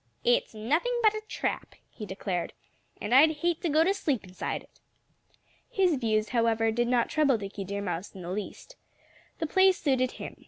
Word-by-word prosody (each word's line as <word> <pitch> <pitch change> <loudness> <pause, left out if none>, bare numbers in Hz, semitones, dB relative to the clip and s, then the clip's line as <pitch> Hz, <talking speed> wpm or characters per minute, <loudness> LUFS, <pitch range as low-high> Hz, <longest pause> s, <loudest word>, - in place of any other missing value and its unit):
"It's 240 -2 +2
nothing 315 - 0
but 430 -1 +6
a 430 - -4
trap," - - -3 0.2
he 210 - -8
declared. 185 -2 -3 0.5
"And 225 - -3
I'd 305 +4 +6
hate 345 -2 +1
to 345 - -1
go 310 +2 +4
to 380 +4 +2
sleep 285 - -1
inside 185 0 -5
it." - - -26 0.9
His 370 -5 +2
views, 215 -4 0
however, 225 -2 +2
did 240 +2 0
not 240 -1 +2
trouble 290 -5 +2
Dickie 200 -1 -6
Deer 200 +1 -4
Mouse 180 +1 -4
in 185 - -8
the 175 - -5
least. 210 - -6 0.6
The 325 - -2
place 380 +3 +4
suited 260 -5 +1
him. - - -8
240 Hz, 185 wpm, -28 LUFS, 210-320 Hz, 0.9 s, but